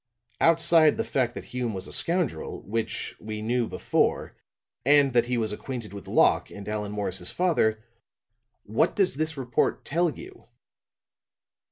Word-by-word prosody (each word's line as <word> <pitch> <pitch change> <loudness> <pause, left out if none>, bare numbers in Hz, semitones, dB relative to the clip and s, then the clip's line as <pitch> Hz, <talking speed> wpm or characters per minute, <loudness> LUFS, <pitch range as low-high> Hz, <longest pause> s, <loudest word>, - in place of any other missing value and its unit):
"Outside 165 -1 +5
the - - 0
fact 125 -3 -1
that - - -6
Hume 125 -4 -4
was 95 0 -4
a - - -2
scoundrel 170 - -1
which 115 +3 -3
we 110 0 -6
knew 120 +1 0
before - - 0 0.5
and 140 0 +5
that 120 -1 +3
he 125 0 0
was 110 -2 -1
acquainted 115 -1 -6
with 100 -2 -9
Locke - - +3
and 100 -1 -10
Allan 105 -1 -3
Morris's 95 -3 -2
father, 110 -12 +1 0.8
what 110 +3 +1
does 195 -6 +2
this 155 -1 0
report 125 -3 -1
tell 170 +3 +1
you?" 365 - -11
120 Hz, 150 wpm, -26 LUFS, 105-155 Hz, 0.8 s, Outside